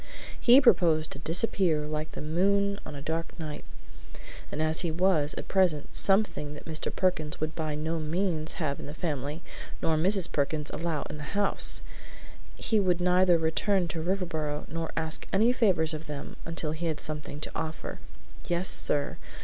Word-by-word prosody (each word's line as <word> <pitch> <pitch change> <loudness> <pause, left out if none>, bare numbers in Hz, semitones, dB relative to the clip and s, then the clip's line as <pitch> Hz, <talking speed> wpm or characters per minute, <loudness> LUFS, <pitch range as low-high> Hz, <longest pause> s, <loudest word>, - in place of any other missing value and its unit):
He 250 +2 +8
proposed 165 - +4
to 140 - -7
disappear, 165 -1 +1
like 155 +1 -4
the - - -6
moon 200 +5 +1
on - - -7
a 140 - -7
dark 165 +3 -3
night, 155 -2 -5 0.9
and 150 - -4
as 155 0 +2
he 175 - -1
was, 160 -3 +2
at - - -6
present, 180 -6 +1
something 195 -7 +1
that - - -11
Mr. 155 -1 -2
Perkins 170 -5 0
would 155 +1 -2
by 155 -2 -3
no 160 +2 -2
means 160 0 0
have 150 -5 -2
in - - -7
the 145 - -7
family 150 -1 -3 0.4
nor 160 -1 +1
Mrs. 190 +3 +5
Perkins 150 +1 -1
allow 160 -2 -2
in 150 - -7
the 150 +7 -5
house, 205 -1 +1 0.7
he 220 - +1
would 180 -3 +2
neither 180 0 +4
return 175 +3 +1
to 160 +1 -3
Riverboro 160 -5 -2
nor 165 +1 -3
ask 160 -1 -2
any 225 +5 +4
favors 185 -10 +2
of 155 +1 -6
them 145 -2 -6
until 165 -2 -3
he 165 +2 -3
had 155 -2 -2
something 150 -1 -4
to - - -5
offer. 160 0 -5 0.5
Yes, 175 +2 0
sir. 145 -1 +1
160 Hz, 175 wpm, -28 LUFS, 155-185 Hz, 0.9 s, He